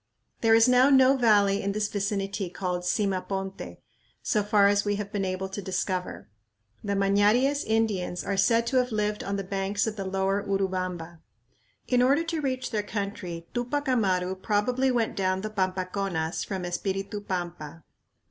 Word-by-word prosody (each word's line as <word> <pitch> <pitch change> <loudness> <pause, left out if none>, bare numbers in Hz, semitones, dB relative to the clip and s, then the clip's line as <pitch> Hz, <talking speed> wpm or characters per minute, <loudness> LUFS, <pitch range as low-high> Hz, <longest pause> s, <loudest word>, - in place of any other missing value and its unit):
There 225 -1 +5
is 225 +2 +6
now 250 +2 +5
no 265 -1 +6
valley 205 -5 +3
in 200 0 -1
this 210 0 0
vicinity 200 -2 -2
called 180 0 -3
Simaponte, 195 0 -2 0.5
so 210 - +1
far 205 -1 +4
as 205 0 +3
we 205 0 0
have 200 0 -5
been 200 -2 -2
able 185 0 -2
to 200 +2 -5
discover. 185 -1 -3 0.6
The 200 -1 -1
Mañaries 205 +8 +3
Indians 215 -5 -1
are 200 - -2
said 230 +4 +3
to 260 +2 0
have 250 -1 +1
lived 210 -1 -1
on 200 - -2
the 195 - -3
banks 195 +1 -1
of 220 -1 -4
the 195 - -3
lower 195 +1 0
Urubamba. 185 -4 -3 0.7
In 250 -1 +3
order 275 +6 +3
to 330 -1 -3
reach 255 -3 -2
their 215 -3 0
country 200 -5 -5
Tupac 265 +4 -2
Amaru 190 -7 +1
probably 220 +7 0
went 235 -3 0
down 185 -1 0
the 215 +1 -5
Pampaconas 185 -3 -2
from 190 -2 -4
Espiritu 195 +3 -3
Pampa. 175 -5 -5
200 Hz, 165 wpm, -27 LUFS, 190-225 Hz, 0.7 s, is